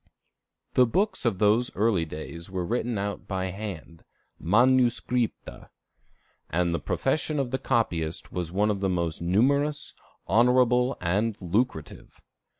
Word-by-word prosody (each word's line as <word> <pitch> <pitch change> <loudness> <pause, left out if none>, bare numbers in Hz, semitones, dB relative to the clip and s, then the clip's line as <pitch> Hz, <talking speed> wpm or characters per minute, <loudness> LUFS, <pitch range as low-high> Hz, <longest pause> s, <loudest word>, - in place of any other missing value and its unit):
The 125 -1 +5
books 195 - 0
of 115 -5 +1
those 110 +4 +3
early 100 -5 +2
days 80 +2 -8
were 95 -2 -3
written 120 +2 -1
out 100 +1 -4
by 95 -1 -2
hand, 90 -5 -8 0.4
manuscripta; 120 +4 +1 0.8
and 85 +1 0
the 85 - -1
profession 145 - -1
of 135 -3 -1
the 130 - -1
copyist 85 -11 -1
was 85 -2 -4
one 105 +3 +2
of 100 - -2
the 95 0 0
most 85 -3 -2
numerous, 140 +11 +1 0.3
honorable, 125 +4 +3
and 105 +5 0
lucrative. 95 -2 -3
105 Hz, 130 wpm, -26 LUFS, 90-125 Hz, 0.8 s, The